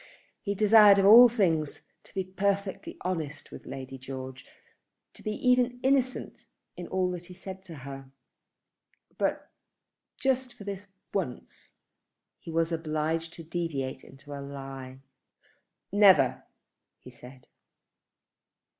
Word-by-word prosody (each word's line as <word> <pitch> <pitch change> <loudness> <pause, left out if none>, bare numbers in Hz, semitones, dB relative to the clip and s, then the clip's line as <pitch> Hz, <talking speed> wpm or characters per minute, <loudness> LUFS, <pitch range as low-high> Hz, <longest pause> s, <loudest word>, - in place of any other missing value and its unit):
He 200 -1 -2
desired 210 -1 +7
of 195 - +3
all 235 +4 +10
things 165 -10 0 0.2
to - - -17
be 190 - 0
perfectly 195 +1 -2
honest 160 -5 -4
with - - -11
Lady 135 0 -7
George, 130 0 -8 0.7
to - - -14
be 215 - -3 0.2
even 250 0 +3
innocent 260 -1 0 0.3
in 175 - -7
all 185 -1 0
that 175 -1 -7
he 180 - -11
said 190 0 -9
to 170 -3 -9
her; 135 -1 -8 1.1
but - - -1 0.7
just 260 -1 0
for - - -11
this 200 0 -6 0.3
once 175 -11 -5 0.7
he - - -11
was 165 +1 0
obliged 160 0 -2
to 165 - -9
deviate 155 -6 -3
into 145 +1 -12
a 140 - -6
lie. 135 -1 -8 0.9
"Never!" 185 -11 +5 0.5
he 125 - -14
said. 125 +1 -14
170 Hz, 125 wpm, -28 LUFS, 135-200 Hz, 1.1 s, all